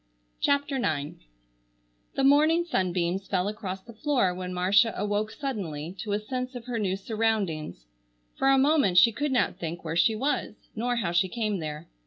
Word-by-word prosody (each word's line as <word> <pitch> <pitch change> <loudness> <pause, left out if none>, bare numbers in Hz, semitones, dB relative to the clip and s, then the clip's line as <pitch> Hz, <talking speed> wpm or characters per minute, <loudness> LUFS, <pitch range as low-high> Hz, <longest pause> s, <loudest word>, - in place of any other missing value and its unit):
CHAPTER 285 -1 +1
IX 150 - -2 0.9
The 270 - 0
morning 310 +5 +4
sunbeams 185 - -1
fell 185 -1 0
across 195 -3 -5
the 230 - -12
floor 240 -6 +1
when 180 0 -5
Marcia 195 +5 +3
awoke 210 +1 -1
suddenly 185 - -5
to 210 -2 -3
a 205 - +1
sense 255 +4 -4
of 240 -1 -7
her 245 -2 -3
new 190 -3 0
surroundings. 195 - -2 0.5
For 270 - 0
a 270 - +5
moment 275 - +3
she 230 +6 +8
could 290 +5 -2
not 255 - +1
think 170 0 -5
where 160 0 -3
she 170 +6 +3
was 270 -2 -1 0.2
nor 245 +2 -1
how 200 -8 -1
she 180 +2 +2
came 215 -2 -2
there. 155 0 -6
210 Hz, 175 wpm, -27 LUFS, 180-250 Hz, 0.9 s, she